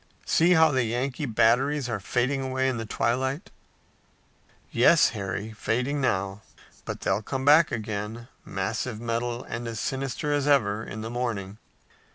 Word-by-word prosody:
See 170 Hz, +2 st, +4 dB
how 160 Hz, -2 st, +5 dB
the 130 Hz, -3 st, +2 dB
Yankee 130 Hz, +5 st, -2 dB
batteries 125 Hz, +5 st, +2 dB
are 110 Hz, -4 st, -2 dB
fading 130 Hz, +7 st, 0 dB
away 130 Hz, 0 st, 0 dB
in 130 Hz, -2 st, 0 dB
the 115 Hz, -1 st, -5 dB
twilight." 130 Hz, -, -1 dB, 1.2 s
"Yes, 170 Hz, -, +5 dB
Harry, 100 Hz, 0 st, -4 dB
fading 125 Hz, +7 st, -1 dB
now, 95 Hz, -4 st, -1 dB, 0.4 s
but -, -, -5 dB
they'll 95 Hz, +2 st, 0 dB
come 130 Hz, +4 st, -4 dB
back 150 Hz, +3 st, +6 dB
again, 110 Hz, +1 st, -4 dB, 0.2 s
massive 105 Hz, +4 st, -3 dB
metal 120 Hz, +1 st, -2 dB
and 120 Hz, 0 st, -5 dB
as 115 Hz, -2 st, -4 dB
sinister 135 Hz, +4 st, -2 dB
as 145 Hz, -1 st, 0 dB
ever, 110 Hz, -7 st, +2 dB
in 110 Hz, +2 st, -7 dB
the 110 Hz, +1 st, -5 dB
morning." 110 Hz, -5 st, -3 dB
120 Hz, 150 wpm, -26 LUFS, 110-135 Hz, 1.2 s, back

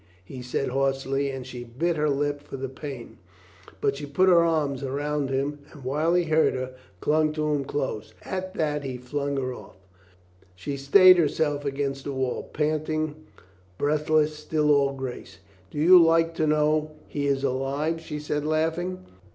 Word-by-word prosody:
he 125 Hz, +6 st, -8 dB
said 125 Hz, +2 st, -2 dB
hoarsely, 135 Hz, +1 st, 0 dB
and 135 Hz, -2 st, -6 dB
she 125 Hz, -1 st, -7 dB
bit 145 Hz, +9 st, -1 dB
her 150 Hz, -1 st, +1 dB
lip 145 Hz, 0 st, -1 dB
for 145 Hz, -, -8 dB
the 135 Hz, 0 st, -4 dB
pain. 130 Hz, -2 st, -8 dB, 0.6 s
But 140 Hz, -, +1 dB
she 145 Hz, 0 st, -6 dB
put 185 Hz, +7 st, +3 dB
her 170 Hz, -2 st, +6 dB
arms 150 Hz, -5 st, 0 dB
round 145 Hz, +1 st, -2 dB
him 140 Hz, +2 st, -1 dB
and 145 Hz, -, -13 dB
while 150 Hz, +6 st, +1 dB
he 180 Hz, -, +3 dB
hurt 160 Hz, -3 st, +2 dB
her, 130 Hz, 0 st, -4 dB, 0.3 s
clung 155 Hz, 0 st, +2 dB
to 150 Hz, -1 st, 0 dB
him 145 Hz, -1 st, 0 dB
close. 130 Hz, -6 st, -3 dB
At 185 Hz, 0 st, -5 dB
that 150 Hz, -2 st, -1 dB
he 130 Hz, -2 st, -4 dB
flung 140 Hz, +3 st, -3 dB
her 130 Hz, -1 st, -2 dB
ofT. 125 Hz, -, -12 dB, 0.8 s
She 95 Hz, +10 st, -5 dB
stayed 185 Hz, +7 st, +7 dB
herself 145 Hz, -2 st, 0 dB
against 135 Hz, -1 st, -2 dB
the 140 Hz, -, -3 dB
wall, 130 Hz, -1 st, -2 dB
panting, 155 Hz, 0 st, -1 dB, 0.6 s
breathless, 150 Hz, +1 st, +2 dB
still 150 Hz, 0 st, 0 dB
all 140 Hz, -1 st, +3 dB
grace. 130 Hz, -2 st, -7 dB, 0.3 s
"Do -, -, -10 dB
you 175 Hz, +4 st, +8 dB
like 165 Hz, 0 st, +3 dB
to 155 Hz, -1 st, 0 dB
know 155 Hz, 0 st, +2 dB
he 145 Hz, -1 st, -2 dB
is 140 Hz, -1 st, 0 dB
alive?" 140 Hz, +5 st, -1 dB
she 150 Hz, -, -6 dB
said, 150 Hz, 0 st, -2 dB
laughing. 165 Hz, +4 st, -1 dB
145 Hz, 170 wpm, -26 LUFS, 135-155 Hz, 0.8 s, you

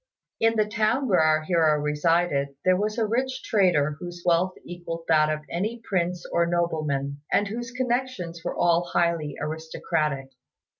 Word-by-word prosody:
In 225 Hz, 0 st, +3 dB
the 215 Hz, -1 st, +3 dB
town 220 Hz, +5 st, 0 dB
where 190 Hz, -5 st, +3 dB
our 155 Hz, 0 st, +3 dB
hero 155 Hz, -3 st, +3 dB
resided, 150 Hz, -1 st, +1 dB
there 185 Hz, 0 st, +5 dB
was 210 Hz, +4 st, -1 dB
a 225 Hz, -, +2 dB
rich 255 Hz, +4 st, -1 dB
trader 165 Hz, -8 st, +2 dB
whose 175 Hz, 0 st, -8 dB
wealth 180 Hz, +2 st, +2 dB
equalled 170 Hz, -1 st, -6 dB
that 155 Hz, -1 st, +4 dB
of 155 Hz, 0 st, -1 dB
any 215 Hz, +7 st, -3 dB
prince 180 Hz, -2 st, -1 dB
or 170 Hz, 0 st, +2 dB
nobleman, 150 Hz, -5 st, -1 dB
and 205 Hz, -, +3 dB
whose 235 Hz, +3 st, -5 dB
connections 245 Hz, -9 st, -2 dB
were -, -, -3 dB
all 170 Hz, 0 st, +3 dB
highly 170 Hz, -4 st, +1 dB
aristocratic. 155 Hz, -3 st, -2 dB
170 Hz, 155 wpm, -25 LUFS, 155-210 Hz, -, there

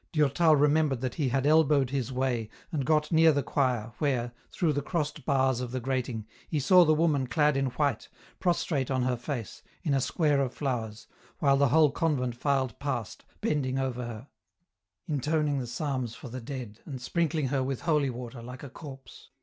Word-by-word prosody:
Durtal 155 Hz, +1 st, +4 dB
remembered 145 Hz, -2 st, +2 dB
that 130 Hz, -1 st, -2 dB
he 145 Hz, -5 st, 0 dB
had 135 Hz, +2 st, 0 dB
elbowed 150 Hz, -4 st, +4 dB
his 135 Hz, -2 st, -2 dB
way, 125 Hz, -4 st, -1 dB, 0.2 s
and 145 Hz, -6 st, -2 dB
got 150 Hz, -1 st, +2 dB
near 160 Hz, 0 st, +6 dB
the 145 Hz, -2 st, 0 dB
choir, 125 Hz, -5 st, 0 dB
where, 125 Hz, -5 st, 0 dB, 0.2 s
through 160 Hz, -4 st, +1 dB
the 145 Hz, -, -1 dB
crossed 150 Hz, -3 st, -3 dB
bars 130 Hz, -2 st, +2 dB
of 125 Hz, -, -4 dB
the 130 Hz, -, -2 dB
grating, 125 Hz, -3 st, -2 dB, 0.2 s
he 155 Hz, -, 0 dB
saw 180 Hz, +6 st, +6 dB
the 155 Hz, -, +3 dB
woman 150 Hz, -5 st, +2 dB
clad 150 Hz, +1 st, +2 dB
in 135 Hz, 0 st, +1 dB
white, 130 Hz, -2 st, -1 dB, 0.3 s
prostrate 165 Hz, -7 st, 0 dB
on 130 Hz, -2 st, +1 dB
her 125 Hz, 0 st, +1 dB
face, 120 Hz, -2 st, -5 dB, 0.2 s
in 150 Hz, -6 st, +1 dB
a 135 Hz, -, +2 dB
square 145 Hz, +1 st, +2 dB
of 130 Hz, -2 st, -2 dB
flowers, 115 Hz, -6 st, -3 dB, 0.3 s
while 140 Hz, -2 st, +3 dB
the 140 Hz, +1 st, +4 dB
whole 155 Hz, +1 st, +5 dB
convent 130 Hz, -6 st, 0 dB
filed 130 Hz, -2 st, 0 dB
past, 120 Hz, -6 st, -4 dB, 0.2 s
bending 135 Hz, -3 st, 0 dB
over 130 Hz, -2 st, -2 dB
her, 120 Hz, +2 st, -7 dB, 0.8 s
intoning 150 Hz, -1 st, 0 dB
the 125 Hz, -, -4 dB
psalms 130 Hz, -2 st, -3 dB
for 130 Hz, -, -9 dB
the 130 Hz, +2 st, -6 dB
dead, 120 Hz, -4 st, -7 dB
and 135 Hz, -4 st, -6 dB
sprinkling 155 Hz, +1 st, 0 dB
her 135 Hz, 0 st, +1 dB
with 130 Hz, -1 st, -2 dB
holy 150 Hz, -5 st, +2 dB
water, 120 Hz, -1 st, -7 dB
like 125 Hz, +2 st, -9 dB
a 140 Hz, -, -8 dB
corpse. 135 Hz, -4 st, -11 dB
135 Hz, 190 wpm, -28 LUFS, 125-150 Hz, 0.8 s, near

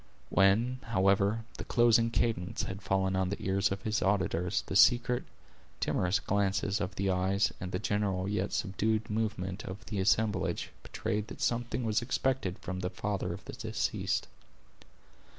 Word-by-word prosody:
When, 110 Hz, +7 st, +3 dB
however, 100 Hz, +1 st, +2 dB
the -, -, -3 dB
closing 115 Hz, -1 st, +4 dB
cadence 115 Hz, -6 st, -1 dB
had 95 Hz, +1 st, -5 dB
fallen 95 Hz, -1 st, +1 dB
on 95 Hz, -1 st, +1 dB
the 100 Hz, -, -3 dB
ears 95 Hz, 0 st, +1 dB
of 100 Hz, 0 st, -3 dB
his 110 Hz, 0 st, 0 dB
auditors, 90 Hz, -2 st, +1 dB
the -, -, -5 dB
secret, 125 Hz, 0 st, +5 dB, 0.5 s
timorous 90 Hz, +3 st, +1 dB
glances 100 Hz, +1 st, 0 dB
of 95 Hz, -1 st, -3 dB
the 95 Hz, 0 st, 0 dB
eyes, 95 Hz, +2 st, +2 dB
and 90 Hz, 0 st, -4 dB
the 90 Hz, -, 0 dB
general 100 Hz, -2 st, 0 dB
and 100 Hz, -, -2 dB
yet 100 Hz, 0 st, -1 dB
subdued 110 Hz, +3 st, -1 dB
movement 105 Hz, -3 st, -2 dB
of 95 Hz, +1 st, -7 dB
the 105 Hz, -, -3 dB
assemblage, 105 Hz, +2 st, +1 dB
betrayed 105 Hz, 0 st, -3 dB
that -, -, -9 dB
something 120 Hz, +1 st, -1 dB
was 110 Hz, 0 st, +1 dB
expected 130 Hz, -5 st, -1 dB
from 95 Hz, 0 st, -5 dB
the 90 Hz, -1 st, -2 dB
father 100 Hz, 0 st, -2 dB
of -, -, -7 dB
the -, -, -7 dB
deceased. -, -, -1 dB
100 Hz, 160 wpm, -31 LUFS, 95-110 Hz, 0.5 s, secret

